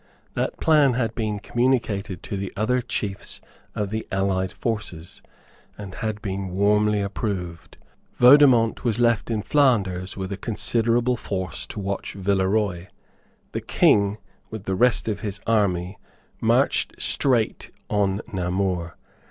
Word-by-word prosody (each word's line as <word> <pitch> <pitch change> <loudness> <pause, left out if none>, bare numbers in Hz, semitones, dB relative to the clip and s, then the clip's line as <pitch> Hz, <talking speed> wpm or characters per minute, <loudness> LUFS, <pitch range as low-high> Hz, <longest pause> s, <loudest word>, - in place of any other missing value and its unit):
That - - -2
plan 150 -5 +4
had 115 -2 -1
been 110 -3 -2
communicated 110 -6 -1
to - - -5
the 100 -1 -4
other 125 +4 +1
chiefs 105 -4 -4 0.4
of 105 -2 -2
the 110 0 -3
allied 95 -1 0
forces, 105 -8 -4 0.6
and 100 -2 -8
had 110 0 -4
been 95 -2 -3
warmly 105 +2 +2
approved. 90 -5 -4 0.4
Vaudemont 125 -3 +6
was 115 -4 +1
left 120 -3 +2
in 110 -3 -1
Flanders 100 -11 +1
with 95 0 -4
a 100 - -3
considerable 115 +3 0
force 95 -6 -4
to - - -7
watch 100 0 -4
Villeroy. 95 -1 0 0.6
The - - -3
King, 100 0 +3 0.3
with 110 -3 -7
the 95 - -2
rest 120 +5 +2
of 105 -2 -1
his 100 -2 -4
army, 100 -4 0 0.4
marched - - +1
straight 120 -5 +1 0.2
on 100 -1 0
Namur. 90 -1 -1
105 Hz, 130 wpm, -24 LUFS, 95-115 Hz, 0.6 s, Vaudemont